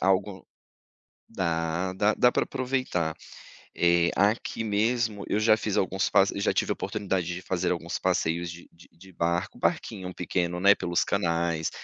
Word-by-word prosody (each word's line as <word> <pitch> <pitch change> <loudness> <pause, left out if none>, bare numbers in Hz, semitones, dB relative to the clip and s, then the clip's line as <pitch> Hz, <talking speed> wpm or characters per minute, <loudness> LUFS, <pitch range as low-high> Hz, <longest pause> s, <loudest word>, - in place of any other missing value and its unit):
algo 95 +1 0 0.8
dá, 85 -2 -1
dá 105 +3 +2
dá 125 - +4
para - - +1
aproveitar. 130 - -2 0.6
Eh, 85 0 +3
aqui 105 +3 +1
mesmo, 110 0 0
eu - - +1
já 110 0 +5
fiz 105 -2 -2
alguns 95 0 0
pas 100 +1 +4
já 100 - +1
tivea - - 0
a - - -3
oportunidade 95 -3 -2
de 90 - -7
fazer 90 -1 -1
alguns 85 0 -3
passeios 85 -2 0
de 85 0 -11
de 85 - -19
de 95 +3 -16
barco, 85 0 -1
barquinho 90 -1 -2
pequeno, 90 -1 -2
né, 100 +2 +7
pelos 85 -3 0
canais, 85 -4 0
95 Hz, 155 wpm, -27 LUFS, 85-105 Hz, 0.8 s, né